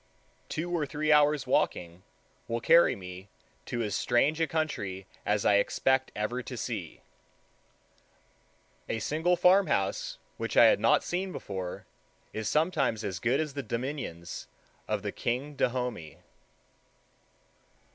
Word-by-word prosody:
Two 170 +3 -3
or 150 -4 -1
three 155 +2 0
hours' 150 -2 +4
walking 90 -8 0 0.5
will 115 0 -1
carry 170 +8 +5
me 90 +1 -9 0.4
to 120 -1 -2
as 105 -2 -3
strange 140 +6 +2
a 165 - +3
country 105 - -2 0.2
as 105 -1 +1
I 100 - +5
expect 130 +5 +1
ever 115 +4 -2
to 125 0 -7
see. 105 -9 -5 1.9
A - - -1
single 160 +10 +1
farmhouse 200 - +2 0.2
which - - -3
I - - +9
had - - +5
not - - +4
seen 185 +2 -2
before 95 - -6 0.5
is 110 0 -2
sometimes 150 - +1
as 95 -5 -3
good 120 +7 +1
as 155 -3 -2
the 140 - -3
dominions 120 - -5 0.4
of - - -1
the - - -2
king 130 +5 -2
of 145 - -16
Dahomey. 125 - -2
125 Hz, 135 wpm, -29 LUFS, 105-155 Hz, 1.9 s, I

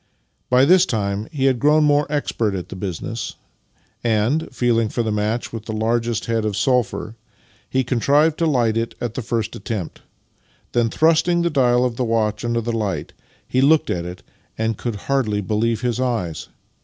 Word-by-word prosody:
By 125 +1 +5
this 185 +4 +5
time 105 -1 -2
he 140 -4 -1
had 130 -3 +3
grown 150 +4 +4
more 145 0 +2
expert 115 -8 -1
at 90 - -5
the - - -7
business, 100 +4 -5 0.7
and, 120 +8 +1
feeling 120 -3 +1
for 120 - -1
the 110 - -1
match 105 +3 -1
with 110 -2 -6
the 110 - -4
largest 115 +1 0
head 115 -1 0
of 105 -2 -2
sulphur, 125 -4 0 0.5
he 130 0 +1
con 125 -1 -1
trived 150 +5 +3
to 165 - +1
light 120 -7 +2
it 115 0 -2
at 120 -2 -3
the 130 - -3
first 115 -1 -2
attempt. 100 -5 -5 0.7
Then, 120 -1 +2
thrust 160 +6 +3
ing 175 -1 +2
the 170 - +1
dial 125 -3 +3
of 120 -2 -2
the 130 - 0
watch 110 -2 0
under 120 0 0
the 120 +1 -3
light, 105 -4 -3 0.3
he 130 - +1
looked 150 +3 +4
at 85 -1 -2
it, 90 +1 -8 0.3
and 110 0 0
could 115 +1 -4
hardly 125 -7 +1
believe 110 +3 0
his 125 -1 -1
eyes 115 -11 -2
115 Hz, 190 wpm, -21 LUFS, 110-130 Hz, 0.7 s, By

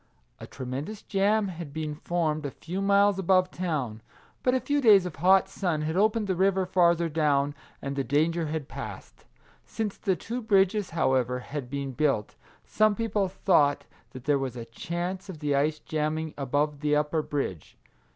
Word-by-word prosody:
A - - -9
tremendous 140 +11 -6
jam 205 +1 +1
had 170 -4 -7
been 155 0 -4
formed 155 -1 -1
a 140 - -2
few 175 +7 -5
miles 200 0 +4
above 185 0 +3
town; 145 -12 -3 0.4
but 250 0 +2
a - - +2
few 290 +2 0
days 205 -7 +6
of 175 -5 -6
hot 190 +4 +5
sun 175 -6 -2
had 160 +2 -2
opened 215 +2 +2
the 190 - 0
river 190 +1 +2
farther 170 -2 +3
down, 145 -2 +1 0.3
and 140 0 -3
the 135 - 0
danger 160 +4 +1
had 150 -2 -4
passed. - - -9 0.4
Since 215 -3 -4
the 190 - 0
two 235 +7 -5
bridges, 200 -2 +2
however, 130 -6 +1
had 140 -2 -6
been 140 0 -3
built, 135 -6 0 0.3
some 215 -1 +2
people 210 -3 0
thought 145 -7 +2 0.2
that 130 -2 -10
there 145 0 +2
was 130 -2 -3
a 120 -2 -6
chance 175 - -5
of 180 - -6
the 150 -1 -1
ice 150 +3 +1
jamming 155 0 -2
above 145 +2 -1
the 150 0 +1
upper 150 +2 +1
bridge. 135 - -4
160 Hz, 175 wpm, -27 LUFS, 145-195 Hz, 0.4 s, days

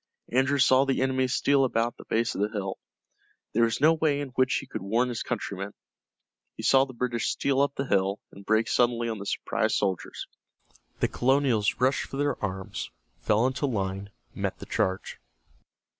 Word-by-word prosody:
Andrew 135 +3 +2
saw 130 0 +5
the 135 -1 0
enemy 130 0 +1
steal 140 +1 +2
about 120 -2 0
the - - -13
base 115 +1 0
of - - -3
the 105 - +1
hill. 100 -3 -4 0.7
There 115 +2 +4
was 115 - -1
no 155 +3 +6
way 155 -3 +1
in 145 -2 -4
which 130 +1 +1
he - - -2
could 130 - -6
warn 115 +6 +1
his 120 - -3
countrymen. 100 -3 -4 0.8
He - - -7
saw 135 0 +5
the 130 - -11
British 120 -2 -1
steal 140 -1 +1
up 140 0 +1
the 135 - -2
hill, 100 -3 +1
and 100 - -13
break 110 +2 +2
suddenly 120 -1 +2
on 110 -2 -4
the 100 - -7
surprised - - 0
soldiers. 95 -3 -2 0.8
The - - +4
colonials 130 -5 +2
rushed 130 +2 +1
for 135 - -7
their 145 -4 -1
arms, 95 -1 -4 0.3
fell 110 +3 +2
into 130 +2 0
line, 100 -4 -3 0.2
met - - -3
the - - -9
charge. 95 0 -2
120 Hz, 185 wpm, -27 LUFS, 105-135 Hz, 0.8 s, no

